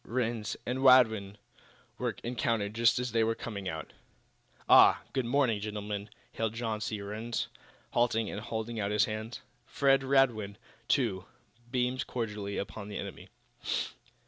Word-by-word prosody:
Rhinds 115 Hz, -2 st, -2 dB
and 125 Hz, +2 st, -2 dB
Radwin 110 Hz, -7 st, +5 dB, 0.6 s
were -, -, -1 dB
encountered 115 Hz, -3 st, -1 dB
just 115 Hz, +1 st, +4 dB
as 125 Hz, 0 st, -1 dB
they 115 Hz, 0 st, +3 dB
were 115 Hz, 0 st, +1 dB
coming 100 Hz, -6 st, -5 dB
out. 80 Hz, -3 st, -6 dB, 0.7 s
"Ah, -, -, +7 dB
good 130 Hz, -3 st, 0 dB
morning, 125 Hz, -4 st, +2 dB
gentlemen," 105 Hz, 0 st, -4 dB, 0.2 s
hailed 115 Hz, 0 st, -2 dB
John 115 Hz, -2 st, -2 dB
C. 110 Hz, -1 st, -2 dB
Rhinds, 110 Hz, +4 st, -3 dB, 0.4 s
halting 115 Hz, -2 st, +2 dB
and 105 Hz, -, -5 dB
holding 115 Hz, 0 st, -4 dB
out 100 Hz, -1 st, 0 dB
his 105 Hz, 0 st, +3 dB
hand. 110 Hz, +2 st, -5 dB, 0.3 s
Fred 135 Hz, -3 st, +3 dB
Radwin, 125 Hz, -7 st, +2 dB, 0.3 s
too, 105 Hz, -9 st, +1 dB, 0.4 s
beamed 125 Hz, +1 st, 0 dB
cordially 105 Hz, -4 st, -3 dB
upon 100 Hz, +1 st, -5 dB
the 105 Hz, -, -5 dB
enemy. -, -, -7 dB
115 Hz, 140 wpm, -31 LUFS, 105-120 Hz, 0.7 s, Ah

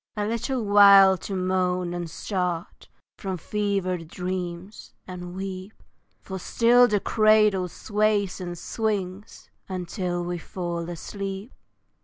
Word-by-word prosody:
A 205 Hz, -, 0 dB
little 235 Hz, +2 st, -2 dB
while 200 Hz, -1 st, +8 dB
to 195 Hz, -, -5 dB
moan, 185 Hz, -1 st, 0 dB
and 175 Hz, -1 st, -4 dB
start 180 Hz, -1 st, -4 dB, 0.3 s
From 190 Hz, -2 st, -3 dB
fevered 190 Hz, -3 st, -2 dB
dreams, 180 Hz, +2 st, -6 dB
and 180 Hz, -1 st, -8 dB
weep, 190 Hz, +1 st, -6 dB, 0.5 s
For 190 Hz, -1 st, -6 dB
still 245 Hz, +6 st, +4 dB
the 210 Hz, -3 st, +1 dB
cradle 215 Hz, -3 st, +3 dB
sways 205 Hz, 0 st, 0 dB
and 175 Hz, -1 st, -5 dB
swings 205 Hz, 0 st, -4 dB, 0.2 s
Until 180 Hz, -1 st, -3 dB
we 175 Hz, 0 st, -3 dB
fall 170 Hz, -1 st, -5 dB
asleep. 195 Hz, -, -6 dB
190 Hz, 115 wpm, -25 LUFS, 180-205 Hz, 0.5 s, while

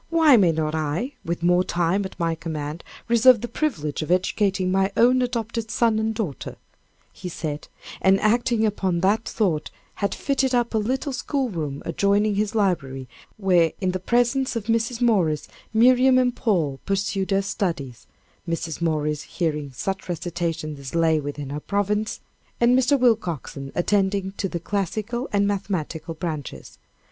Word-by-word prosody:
Why 320 Hz, -4 st, +6 dB
may 190 Hz, -7 st, +5 dB
not 155 Hz, -1 st, -1 dB
I, 160 Hz, -, -2 dB
with 170 Hz, -1 st, -3 dB
more 180 Hz, +1 st, +4 dB
time 175 Hz, +3 st, 0 dB
at 190 Hz, -, -9 dB
my 165 Hz, -1 st, +1 dB
command, 160 Hz, -1 st, -5 dB, 0.2 s
reserve 235 Hz, 0 st, +6 dB
the 240 Hz, -, -3 dB
privilege 165 Hz, -, -2 dB
of 155 Hz, -, -5 dB
educating 185 Hz, +1 st, +1 dB
my 190 Hz, +1 st, +2 dB
own 250 Hz, +2 st, +5 dB
adopted 230 Hz, -2 st, -2 dB
son 230 Hz, -1 st, +2 dB
and 220 Hz, 0 st, 0 dB
daughter," 195 Hz, -, -4 dB, 0.6 s
he 180 Hz, -, -7 dB
said, 150 Hz, -3 st, -5 dB, 0.3 s
and 190 Hz, +1 st, +4 dB
acting 235 Hz, +1 st, +2 dB
upon 190 Hz, -5 st, 0 dB
that 210 Hz, +4 st, +2 dB
thought, 175 Hz, -9 st, -1 dB, 0.3 s
had 200 Hz, -, 0 dB
fitted 270 Hz, -2 st, 0 dB
up 240 Hz, -1 st, +1 dB
a 220 Hz, -, +2 dB
little 260 Hz, +6 st, -2 dB
school 265 Hz, -1 st, -2 dB
room 150 Hz, -6 st, -4 dB
adjoining 205 Hz, +1 st, +2 dB
his 210 Hz, +2 st, -1 dB
library, 140 Hz, -, 0 dB, 0.3 s
where, 180 Hz, -5 st, +3 dB
in 185 Hz, -2 st, 0 dB
the 185 Hz, -, -3 dB
presence 245 Hz, +6 st, +1 dB
of 230 Hz, -, -2 dB
Mrs. 230 Hz, +2 st, 0 dB
Morris, 180 Hz, -11 st, +2 dB, 0.2 s
Miriam 255 Hz, +3 st, +5 dB
and 250 Hz, -1 st, +2 dB
Paul 165 Hz, -, 0 dB
pursued 195 Hz, -1 st, -1 dB
their 195 Hz, 0 st, +1 dB
studies, 150 Hz, -, -3 dB, 0.4 s
Mrs. 165 Hz, -1 st, -3 dB
Morris 150 Hz, -2 st, 0 dB
hearing 150 Hz, -5 st, -3 dB
such 190 Hz, +8 st, -4 dB
recitations 165 Hz, -3 st, -3 dB
as 135 Hz, +3 st, -7 dB
lay 165 Hz, -2 st, +3 dB
within 145 Hz, -1 st, -5 dB
her 145 Hz, -, -3 dB
province, 205 Hz, +4 st, -1 dB, 0.4 s
and 240 Hz, +1 st, +5 dB
Mr. 260 Hz, +2 st, +3 dB
Willcoxen 175 Hz, -, 0 dB
attending 195 Hz, +1 st, +1 dB
to 195 Hz, -, -2 dB
the 170 Hz, -, -3 dB
classical 210 Hz, +7 st, -3 dB
and 200 Hz, 0 st, +2 dB
mathematical 175 Hz, -5 st, -3 dB
branches. 150 Hz, -, -6 dB
195 Hz, 155 wpm, -24 LUFS, 165-230 Hz, 0.6 s, Why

